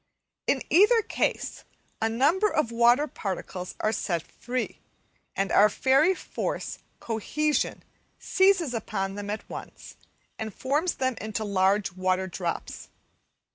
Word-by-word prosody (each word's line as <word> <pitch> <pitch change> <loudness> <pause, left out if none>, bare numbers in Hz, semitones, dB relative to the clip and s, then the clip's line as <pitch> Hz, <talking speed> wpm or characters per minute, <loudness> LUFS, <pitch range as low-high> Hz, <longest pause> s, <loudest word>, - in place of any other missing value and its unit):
In 265 - +2
either 425 +7 +6
case - - -2 0.4
a 225 - +2
number 300 - +3
of 305 - 0
water 240 +5 +4
particles 185 -7 -5
are 215 - +2
set 170 -6 -1
free, 250 +1 -4 0.6
and 195 0 0
our 210 +1 +6
fairy 275 - +3
force - - -4 0.2
"cohesion" 295 +7 -1 0.3
seizes 380 -7 +3
upon 195 -4 -2
them 205 0 -6
at 210 +1 -4
once - - -9 0.4
and 220 -2 -5
forms 295 +7 0
them 260 -2 -1
into 220 0 -3
large 195 0 +2
water 185 +1 0
drops. 175 -1 -4
225 Hz, 125 wpm, -27 LUFS, 195-295 Hz, 0.6 s, either